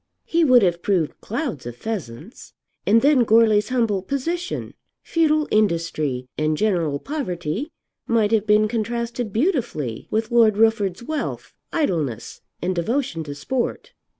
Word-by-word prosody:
He 335 0 +2
would 255 -6 +6
have 175 -2 +1
proved 175 -6 0
clouds 230 - -4
of 120 - -6
pheasants. 190 - -7 0.3
And 225 +3 +5
then 280 -3 +5
Goarly's 220 -2 +4
humble 230 -6 +1
position, 330 - -3 0.3
futile 310 -2 +2
industry, 165 -10 0
and 155 0 +1
general 170 -8 +1
poverty 205 - -4 0.4
might 225 -2 +2
have 220 -1 +2
been 210 0 +4
contrasted 235 +1 -3
beautifully 225 - -1
with 220 +2 -1
Lord 225 -3 +4
Rufford's 220 -3 +2
wealth, 305 +3 -4 0.2
idleness, 160 - -2 0.2
and 185 +1 0
devotion 175 - -1
to 145 -1 -6
sport. 245 - -3
215 Hz, 130 wpm, -22 LUFS, 170-245 Hz, 0.4 s, would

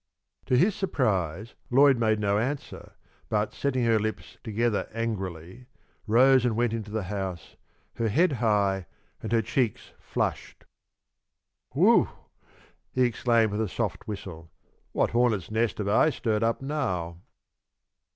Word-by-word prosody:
To 125 - +3
his 195 +10 +4
surprise 110 - -1 0.2
Lloyd 135 0 +5
made 110 -2 +2
no 100 0 +1
answer, 135 +5 -4 0.4
but, 105 0 0
setting 130 -3 -1
her 115 -1 +3
lips 110 +1 -5
together 115 -1 -1
angrily, 95 -1 -5 0.4
rose 130 +3 +5
and 120 -3 +1
went 120 0 +1
into 110 -2 -4
the 110 -1 -3
house, 95 -2 -5 0.4
her 115 -1 0
head 165 - +3
high 100 -5 +1 0.3
and - - -5
her 115 -1 +2
cheeks 120 0 -1
flushed. - - -4 1.1
"Whew!" - - +4 0.8
he 130 - +2
exclaimed, 115 -2 +2
with 105 +2 -1
a 110 - -1
soft - - -3
whistle. 85 -6 -7 0.4
"What - - +1
hornet's 115 -6 +1
nest 115 +1 0
have 105 - -3
I 110 +9 +4
stirred 110 -7 -1
up 115 +3 0
now?" 90 - -2
110 Hz, 135 wpm, -27 LUFS, 100-125 Hz, 1.1 s, Lloyd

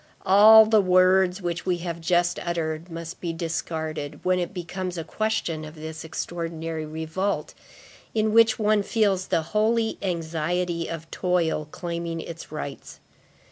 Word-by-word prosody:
All 215 +3 +9
the 215 -1 +4
words 185 0 +3
which 170 +1 -3
we 180 -1 +2
have 170 -1 -4
just 175 +1 +1
uttered, 165 -1 -3
must 165 +1 -7
be 170 - -2
discarded, 160 -2 -4
when 185 0 +3
it 175 - -2
becomes 180 0 -5
a 165 - -3
question 215 -6 -2
of 155 +1 -9
this 160 0 -7
extraordinary 165 -1 -4
revolt, 160 +6 -3 0.6
in 215 -1 +1
which 230 0 +5
one 215 -1 +2
feels 200 -3 +1
the 165 - +1
holy 220 +1 +1
anxiety 170 -1 -2
of 165 -1 -7
toil 170 -4 0
claiming 170 0 -4
its 165 -1 -8
rights. 150 -2 -7
175 Hz, 140 wpm, -25 LUFS, 160-190 Hz, 0.6 s, All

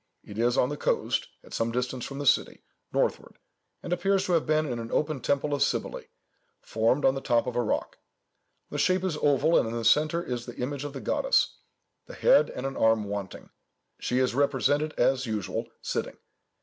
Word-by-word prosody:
It 105 +1 -9
is 120 +2 +2
on 125 - +3
the 145 - -4
coast, - - 0 0.2
at - - -14
some 115 0 0
distance 125 +1 -2
from 135 - -7
the 145 - -4
city, - - +2 0.3
northward, - - -1 0.5
and 175 - -2
appears 195 +2 +1
to - - -2
have 165 -3 +2
been 155 0 +2
an 120 -4 -4
open 150 -2 0
temple 140 +4 0
of 145 - -1
Cybele, - - -1 0.5
formed 115 +6 +1
on 130 - +5
the 135 - -4
top 120 -3 +2
of 125 -1 -4
a 120 - +2
rock. 110 - -2 0.7
The - - -3
shape 185 0 +2
is 185 -5 -1
oval, 150 +3 +3
and - - 0
in 115 - -4
the 115 -1 -3
centre 155 +7 +3
is 125 -5 -4
the 120 - -8
image 140 +3 -3
of 145 - -6
the 135 - -6
goddess, - - +1 0.5
the - - -10
head - - +4
and 125 - -6
an 135 0 -3
arm 110 -1 +3
wanting. 100 -1 -6 0.5
She 125 - -1
is 130 -1 +2
represented, 145 +3 +1
as 130 +1 +2
usual, 105 -4 -3
sitting. - - -3
135 Hz, 200 wpm, -27 LUFS, 120-150 Hz, 0.7 s, on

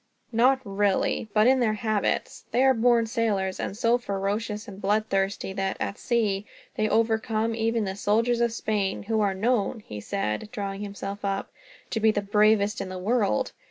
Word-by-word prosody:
"Not 255 +3 +4
really; 200 +2 0
but 215 +1 +4
in 260 +1 +5
their 220 -3 +2
habits. 215 -1 -1
They 250 - +2
are 265 0 +6
born 235 -1 +3
sailors, 215 -5 -1
and - - -3
are - - -11
so 230 +2 +3
ferocious 210 +1 -3
and 200 -1 -10
bloodthirsty 195 -1 0
that, 195 -1 -2
at 200 - -3
sea, 210 -5 0 0.3
they 215 0 0
overcome 225 0 +1
even 225 0 0
the 190 0 -3
soldiers 230 +4 +1
of 235 -1 +2
Spain; 210 -4 -1
who 220 +1 0
are 200 -2 +1
known," 225 +1 0
he 105 - -8
said, 105 - -3
drawing 200 -3 -4
himself 200 0 -6
up, 195 0 -2 0.4
"to 225 - 0
be 220 0 +4
the 205 -1 0
bravest 210 0 +3
in 185 - -5
the 185 - -5
world. 200 - +1
215 Hz, 180 wpm, -26 LUFS, 195-230 Hz, 0.4 s, are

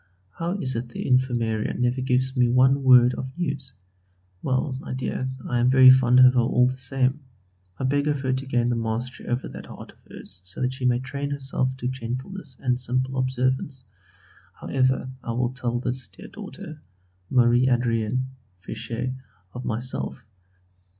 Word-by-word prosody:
How 170 - -3
is 130 -9 -2
it 120 +1 -3
the - - -6
infirmarian 120 -4 +1
never 125 +1 0
gives 130 +1 0
me 125 -2 +3
one 130 +3 +4
word 125 -2 +7
of 130 +1 -5
news? 140 -7 -3 0.7
Well, 130 0 0
my 130 - -5
dear, 130 0 -2 0.2
I 120 - 0
am 120 +1 +4
very 130 0 +9
fond 130 -1 +5
of 130 0 +8
her 125 - +3
all 125 +1 +3
the 130 - -2
same. 130 +1 0 0.6
I - - -4
beg 145 +2 +1
of 145 -2 0
her 130 -1 0
to 130 +1 -3
gain 120 -2 +1
the 120 - +1
mastery 115 +2 -3
over 120 +1 -1
that - - -9
heart - - -10
of - - -28
hers 90 - -10
so 90 +2 -10
that 125 +1 0
she 130 -1 -4
may 125 -1 +3
train 140 +3 -4
herself 135 -2 -2
to 125 - -3
gentleness 130 +5 -5
and 125 -1 0
simple 130 +1 -1
observance; 130 +1 -1 0.7
however, 130 -1 0
I 115 - -3
will 120 +1 -1
tell 120 -2 -2
this 125 -1 -2
dear - - -13
daughter, 155 -1 -9 0.5
Marie 125 0 +4
Adrienne 120 0 +1 0.4
(Fichet), 115 +5 -4 0.4
of 125 - -6
this - - -6
myself. 120 +1 -3
130 Hz, 175 wpm, -25 LUFS, 120-130 Hz, 0.7 s, very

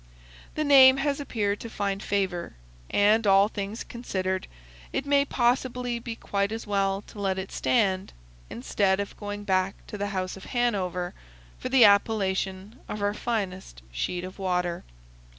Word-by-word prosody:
The 305 - 0
name 270 -2 +8
has 280 0 0
appeared 210 -7 -1
to 230 - -7
find 200 -2 -2
favor, 190 - -2 0.3
and 210 +2 +3
all 195 +1 +6
things 205 +1 -5
considered, 190 -6 -3 0.4
it 270 - -2
may 280 0 +3
possibly 245 -1 0
be 230 -1 -6
quite 200 -2 -1
as 225 +1 -5
well 195 -1 0
to 210 - -13
let 190 -1 0
it 190 0 -5
stand, 195 -5 +1 0.4
instead 190 - 0
of 200 - -4
going 205 0 -6
back 190 -1 +1
to 210 - -8
the 205 - -1
House 185 -2 -3
of 195 - -11
Hanover 190 -8 -1 0.5
for - - -4
the 255 -3 +7
appellation 200 0 +1
of 210 -1 -4
our 205 0 +1
finest 190 - -4
sheet 175 - -3
of 185 +2 -8
water. 180 -2 -1
200 Hz, 155 wpm, -27 LUFS, 190-230 Hz, 0.5 s, name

